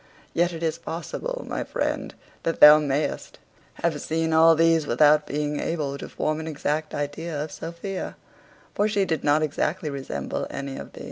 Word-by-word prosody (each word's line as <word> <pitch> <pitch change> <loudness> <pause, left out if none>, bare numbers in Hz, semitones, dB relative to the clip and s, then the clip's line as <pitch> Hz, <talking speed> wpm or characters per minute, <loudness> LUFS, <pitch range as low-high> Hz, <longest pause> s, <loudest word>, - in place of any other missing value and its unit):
Yet 175 +1 +2
is 165 -1 -2
it 170 - -28
possible, - - -5
my - - -2
friend, - - -3 0.3
that 165 - -2
thou 150 +1 +10
mayest 145 0 -2 0.5
have 160 -3 0
seen 160 0 -1
all 165 +1 +7
these 165 -1 +3
without 150 +4 +4
being 150 0 -2
able 150 -4 -2
to - - -7
form 155 0 -1
an 160 - -6
exact 150 0 -2
idea 145 +2 -3
of 155 - -7
Sophia; 170 +4 -6 0.6
for 205 - +2
she 205 -2 +1
did 160 -5 -2
not 150 +1 +3
exactly 155 +2 -1
resemble 135 - -4
any 140 -1 -5
of - - -9
them. - - -11
155 Hz, 175 wpm, -25 LUFS, 150-165 Hz, 0.6 s, thou